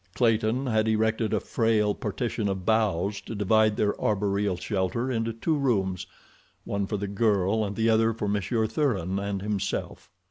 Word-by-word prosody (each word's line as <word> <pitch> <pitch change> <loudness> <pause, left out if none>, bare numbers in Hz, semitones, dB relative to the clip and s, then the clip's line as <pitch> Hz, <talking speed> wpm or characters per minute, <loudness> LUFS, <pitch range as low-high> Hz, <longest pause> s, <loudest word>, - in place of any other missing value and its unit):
Clayton 115 +3 +2
had 110 -3 +1
erected 110 0 +1
a 110 - +2
frail 110 -2 +1
partition 110 0 -2
of 95 -2 -4
boughs 105 -3 +1
to 115 - -7
divide 110 +1 +3
their 105 -1 +2
arboreal 100 -2 0
shelter 105 +7 -1
into 115 -1 -1
two 135 +8 -1
rooms—one 95 - -3
for 105 - -2
the 100 - -3
girl 100 0 +1
and 100 -1 -3
the 110 +1 +1
other 115 0 +4
for 110 -2 -3
Monsieur 105 +3 0
Thuran 105 - -1
and 100 -1 -3
himself. 100 -3 -3
105 Hz, 155 wpm, -26 LUFS, 100-115 Hz, -, other